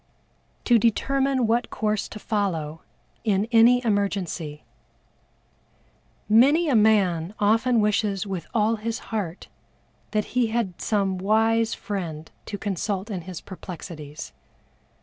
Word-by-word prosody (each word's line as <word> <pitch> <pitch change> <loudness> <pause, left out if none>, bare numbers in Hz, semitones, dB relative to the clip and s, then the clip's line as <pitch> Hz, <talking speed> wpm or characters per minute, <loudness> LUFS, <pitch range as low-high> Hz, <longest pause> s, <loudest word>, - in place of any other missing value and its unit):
To 240 -2 +5
determine 265 +3 +1
what 230 +1 +1
course 215 -1 -1
to - - -9
follow 170 -8 -2 0.4
in 205 -1 +1
any 240 +2 +5
Emergency. 195 -8 -1 1.6
Many 280 +10 +5
a 265 - +3
man 200 -5 +3
often 225 +4 +3
wishes 210 -2 +1
with 190 -4 -5
all 225 0 +2
his 225 +1 -3 0.2
heart 190 -5 -3 0.6
that 210 -1 0
he 250 -2 +3
had 220 -6 -2
some 195 -3 0
wise 225 +3 +2
friend 170 -6 -5 0.2
to 205 - -4
consult 200 +1 -3
in 185 -3 -3
his 180 -3 -6
perplexities. 155 - -9
210 Hz, 115 wpm, -24 LUFS, 185-225 Hz, 1.6 s, To